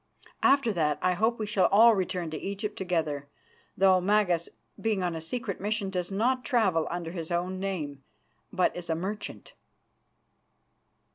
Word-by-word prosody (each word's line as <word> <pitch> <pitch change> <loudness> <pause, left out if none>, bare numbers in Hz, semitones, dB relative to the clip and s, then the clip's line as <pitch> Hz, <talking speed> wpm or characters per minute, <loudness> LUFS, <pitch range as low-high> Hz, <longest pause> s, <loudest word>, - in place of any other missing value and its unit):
After 275 -5 +4
that 150 -4 +1
I 185 - +3
hope 225 +6 +1
we 215 - -2
shall 205 -2 +3
all 225 +3 +7
return 180 -4 -2
to 155 - -4
Egypt 200 +2 -4
together, 155 -6 -2 0.5
though 190 -1 +5
Magas, 185 -4 +2 0.3
being 215 -4 0
on 175 -1 -1
a 160 - -5
secret 205 +3 -4
mission, 205 -1 -1
does 180 0 -2
not 250 +6 +1
travel 200 - +2
under 170 -1 -4
his 165 -3 -5
own 180 +2 -2
name, 155 -8 -4 0.5
but 185 -2 +1
as 175 -1 -7
a 160 - +1
merchant." 195 +6 -6
185 Hz, 155 wpm, -28 LUFS, 170-210 Hz, 0.5 s, all